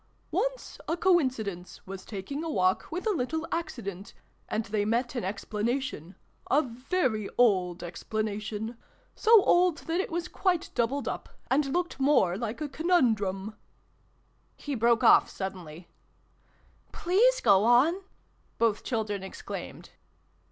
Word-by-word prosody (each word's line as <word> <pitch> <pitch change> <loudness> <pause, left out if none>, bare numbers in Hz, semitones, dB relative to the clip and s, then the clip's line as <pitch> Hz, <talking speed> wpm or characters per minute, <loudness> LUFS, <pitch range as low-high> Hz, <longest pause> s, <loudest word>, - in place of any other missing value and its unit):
" - - -39
Once - - -2
a 330 - -1
coincidence 255 - 0
was 190 0 -8
taking 230 +9 -5
a 330 - -3
walk 185 -8 +1
with 355 +6 -4
a 440 - +2
little 320 0 -2
accident, 215 - -5 0.3
and 215 0 -1
they 205 0 -1
met 235 +4 0
an 245 - -3
explanation 210 - -3 0.3
a 295 +3 +4
very 250 - -1
old 185 -7 +2
explanation 215 +4 -4 0.4
so 450 -3 +6
old 355 -2 +4
that 330 +2 -1
it - - -5
was 345 +1 -2
quite 360 -2 -1
doubled 255 +4 0
up, - - -4 0.2
and 275 +2 +3
looked 345 +2 -2
more 265 -11 +3
like 230 +6 -4
a 300 - -1
conun 315 -4 +3
drum 195 +1 -4 0.5
" - - -40
he 290 - -2
broke 235 -2 +2
off - - +6
suddenly. 180 -4 -7 0.5
" - - -35
Please 465 +8 +4
go 200 -3 +5
on! 260 - +4 0.3
" - - -39
both 225 -2 +1
children 215 -5 -2
exclaimed. 190 - -8
235 Hz, 145 wpm, -28 LUFS, 200-320 Hz, 0.5 s, so